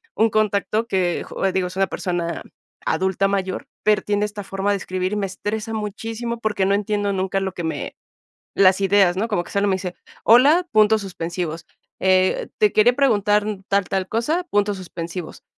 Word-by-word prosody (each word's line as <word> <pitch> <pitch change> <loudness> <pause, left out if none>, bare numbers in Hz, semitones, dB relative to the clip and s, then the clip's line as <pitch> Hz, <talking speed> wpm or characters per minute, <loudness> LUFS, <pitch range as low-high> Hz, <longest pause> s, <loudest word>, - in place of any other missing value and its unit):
un 225 +1 +3
contacto 215 +1 0
que, 180 -4 0 0.3
digo, 185 -1 0
es 180 - -9
una 195 0 +2
persona 175 -2 -3 0.4
adulta 190 +3 +1
mayor, 190 -2 -2 0.2
pero 215 -1 +3
tiene 205 0 0
esta 210 0 -6
forma 195 +1 -2
de 200 - +1
escribir 185 0 -3
y - - 0
me 205 -1 -1
estresa 210 +4 -4
muchísimo 225 +2 -4
porque 210 -4 0
no 200 - +3
entiendo 205 0 -1
nunca 190 0 -1
lo 190 -1 -3
que 175 - -5
me, 160 - -4 0.6
las 190 0 +5
ideas, 195 -2 +4
no 215 +4 -1
como 175 -6 -1
que - - -13
solo 200 0 +1
me 190 - +2
dice: 180 -1 -5 0.3
"Hola, 285 +10 +6
puntos 215 0 +4
suspensivos, 170 -3 -5 0.3
eh, 185 0 +2
te 210 -1 +3
quería 235 +3 +5
preguntar 210 -6 +3 0.2
tal, 200 0 +2
tal 190 -1 -1
cosa, 300 +11 0
puntos 205 - 0
suspensivos, 170 -1 -7
200 Hz, 175 wpm, -22 LUFS, 185-215 Hz, 0.6 s, Hola